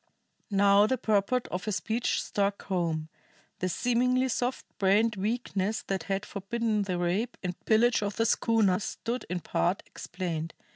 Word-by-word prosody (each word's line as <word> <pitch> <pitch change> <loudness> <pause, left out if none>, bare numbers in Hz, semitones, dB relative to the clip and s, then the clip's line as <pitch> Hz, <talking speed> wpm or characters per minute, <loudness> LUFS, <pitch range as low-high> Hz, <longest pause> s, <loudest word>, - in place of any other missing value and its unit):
Now 200 0 +5
the 260 - +1
purport 220 +3 +1
of 180 +1 -4
her 215 - -1
speech 225 +4 -1
struck 200 0 -1
home; 165 -4 -1 0.5
the 185 - 0
seemingly 250 +5 +2
soft 245 +1 -1
brained 210 +3 +3
weakness 210 0 -1
that 190 -4 -3
had 195 +1 -1
forbidden 215 +2 -1
the 185 -3 -2
rape 185 +8 -1
and 180 -1 -1
pillage 230 +2 +4
of 205 -1 -2
the 225 - +1
schooner 220 -5 +3
stood 235 +4 -4
in 180 -1 -2
part 180 +4 0
explained. 165 -3 -5
205 Hz, 150 wpm, -29 LUFS, 185-230 Hz, 0.5 s, Now